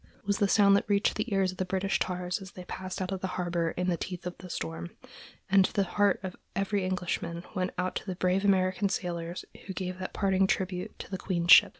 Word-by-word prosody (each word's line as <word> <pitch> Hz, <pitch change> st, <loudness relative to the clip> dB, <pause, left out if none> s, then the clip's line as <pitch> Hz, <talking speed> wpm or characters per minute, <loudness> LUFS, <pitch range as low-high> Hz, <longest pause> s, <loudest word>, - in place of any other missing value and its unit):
was 200 Hz, 0 st, +1 dB
the 200 Hz, -, +4 dB
sound 200 Hz, 0 st, +6 dB
that 200 Hz, -, +1 dB
reached 200 Hz, 0 st, +3 dB
the 215 Hz, +2 st, -3 dB
ears 195 Hz, -2 st, +2 dB
of 185 Hz, -, -12 dB
the -, -, +2 dB
British 190 Hz, +1 st, 0 dB
tars 180 Hz, +1 st, -2 dB
as 190 Hz, -1 st, -10 dB
they 180 Hz, -, -8 dB
passed 185 Hz, +1 st, -4 dB
out 185 Hz, -, -4 dB
of 190 Hz, -1 st, -3 dB
the 190 Hz, -, -1 dB
harbor 175 Hz, -2 st, 0 dB
in 180 Hz, -, 0 dB
the 180 Hz, -, +2 dB
teeth 180 Hz, -1 st, -5 dB
of 180 Hz, -, -4 dB
the 185 Hz, -, -9 dB
storm; 85 Hz, -, -4 dB, 0.6 s
and 195 Hz, 0 st, +6 dB
the 200 Hz, -, +4 dB
heart 205 Hz, +2 st, +2 dB
of 185 Hz, -1 st, -4 dB, 0.2 s
every 195 Hz, +1 st, 0 dB
Englishman 180 Hz, -2 st, -2 dB
went 185 Hz, -1 st, 0 dB
out 180 Hz, +1 st, 0 dB
to -, -, -6 dB
the 185 Hz, -, -2 dB
brave 185 Hz, +2 st, +1 dB
American 190 Hz, 0 st, +3 dB
sailors 170 Hz, -2 st, -3 dB, 0.2 s
who 190 Hz, -, -4 dB
gave 185 Hz, 0 st, -4 dB
that 185 Hz, -, -4 dB
parting 195 Hz, -1 st, +2 dB
tribute 185 Hz, -1 st, -2 dB
to -, -, -9 dB
the 190 Hz, -, -3 dB
Queen's 175 Hz, -2 st, +1 dB
ship. -, -, +10 dB
185 Hz, 235 wpm, -29 LUFS, 180-195 Hz, 0.6 s, ship